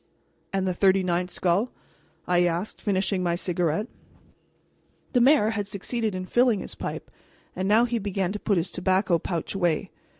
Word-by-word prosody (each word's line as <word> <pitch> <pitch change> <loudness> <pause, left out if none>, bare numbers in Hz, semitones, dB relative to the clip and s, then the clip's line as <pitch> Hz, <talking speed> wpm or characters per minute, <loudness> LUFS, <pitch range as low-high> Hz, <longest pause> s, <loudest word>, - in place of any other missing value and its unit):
"And 190 -1 0
the 185 - +1
thirty 190 +1 +3
ninth 180 0 0
skull?" 185 +7 +1 0.6
I 180 0 +3
asked, 175 +4 -2
finishing 195 -1 0
my 175 -1 +1
cigarette. 175 +1 -1 1.3
The 245 - +4
mayor 255 -4 +5
had 205 -3 -3
succeeded 215 +1 -2
in 185 0 -4
filling 240 0 +2
his - - -6
pipe, - - -6 0.4
and 185 +1 -2
now 220 +4 +5
he 240 -1 -1
began 195 -2 -2
to 210 - -4
put 205 -2 +1
his 170 +2 -1
tobacco 185 -1 +1
pouch 170 0 -3
away. 175 -5 0
190 Hz, 165 wpm, -26 LUFS, 180-210 Hz, 1.3 s, mayor